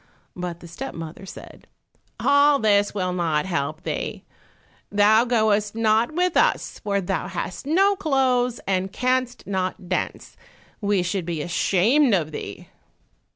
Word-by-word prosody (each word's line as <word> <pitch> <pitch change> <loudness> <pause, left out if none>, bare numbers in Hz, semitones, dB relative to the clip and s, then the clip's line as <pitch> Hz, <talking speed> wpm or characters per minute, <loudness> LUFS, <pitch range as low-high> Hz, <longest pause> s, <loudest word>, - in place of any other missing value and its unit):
But 175 -1 -5
the 170 - -10
step 255 +11 -7
mother 165 +4 -8
said, - - -12 0.5
"All 285 0 +4
this 205 -4 +3
will 185 -3 -2
not 165 -3 0
help 155 -3 -3
thee; - - -4 0.7
thou 210 +3 +5
goest 215 -3 +1
not 225 +3 +2
with 360 0 +1
us, - - +1
for 200 -1 -1
thou 185 -1 -2
hast 180 +4 -5
no 390 +6 +3
clothes 260 -8 +1
and 190 0 -1
canst 255 +2 -1
not 185 -2 -3
dance; 185 - -3 0.5
we 200 -3 +1
should 175 0 -2
be 165 -3 -2
ashamed 210 - +3
of 155 -4 -1
thee!" - - -7
205 Hz, 140 wpm, -23 LUFS, 180-250 Hz, 0.7 s, thou